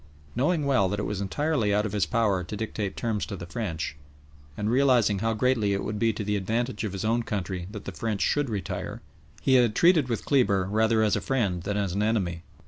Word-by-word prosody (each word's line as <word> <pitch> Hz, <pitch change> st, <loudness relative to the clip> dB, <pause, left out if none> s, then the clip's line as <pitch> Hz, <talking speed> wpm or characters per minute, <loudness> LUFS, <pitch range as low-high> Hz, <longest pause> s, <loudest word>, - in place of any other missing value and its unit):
Knowing 150 Hz, +3 st, +1 dB
well 115 Hz, -9 st, +3 dB
that 100 Hz, +2 st, -2 dB
it -, -, -2 dB
was 100 Hz, -1 st, -3 dB
entirely 125 Hz, +2 st, 0 dB
out 105 Hz, +1 st, +2 dB
of 105 Hz, -, -3 dB
his 100 Hz, -6 st, 0 dB
power 100 Hz, -1 st, +1 dB
to 105 Hz, +4 st, -6 dB
dictate 105 Hz, -2 st, -4 dB
terms 110 Hz, -4 st, -1 dB
to 100 Hz, -, -4 dB
the 85 Hz, -, -7 dB
French, 85 Hz, -6 st, -4 dB, 0.6 s
and 105 Hz, +1 st, -1 dB
realising 125 Hz, -6 st, +3 dB
how 115 Hz, +2 st, 0 dB
greatly 110 Hz, -3 st, +2 dB
it 100 Hz, -, -1 dB
would 105 Hz, 0 st, -3 dB
be 115 Hz, +1 st, +3 dB
to 105 Hz, 0 st, -5 dB
the 105 Hz, +1 st, -1 dB
advantage 110 Hz, +4 st, -1 dB
of 105 Hz, -3 st, -3 dB
his 95 Hz, +1 st, -3 dB
own 115 Hz, +2 st, +2 dB
country 95 Hz, -5 st, -4 dB
that 105 Hz, -1 st, -8 dB
the -, -, -4 dB
French 110 Hz, -4 st, -3 dB
should 145 Hz, -3 st, +1 dB
retire, 100 Hz, -5 st, -4 dB, 0.4 s
he 135 Hz, -, +3 dB
had 120 Hz, -4 st, +4 dB
treated 170 Hz, -7 st, +4 dB
with 115 Hz, -, -2 dB
Kleber 100 Hz, -9 st, +3 dB
rather 110 Hz, +1 st, +3 dB
as 105 Hz, -2 st, +2 dB
a -, -, -1 dB
friend 100 Hz, -10 st, 0 dB
than 105 Hz, +3 st, -2 dB
as 100 Hz, -3 st, -1 dB
an 100 Hz, -, 0 dB
enemy. 95 Hz, -6 st, 0 dB
105 Hz, 225 wpm, -27 LUFS, 100-120 Hz, 0.6 s, had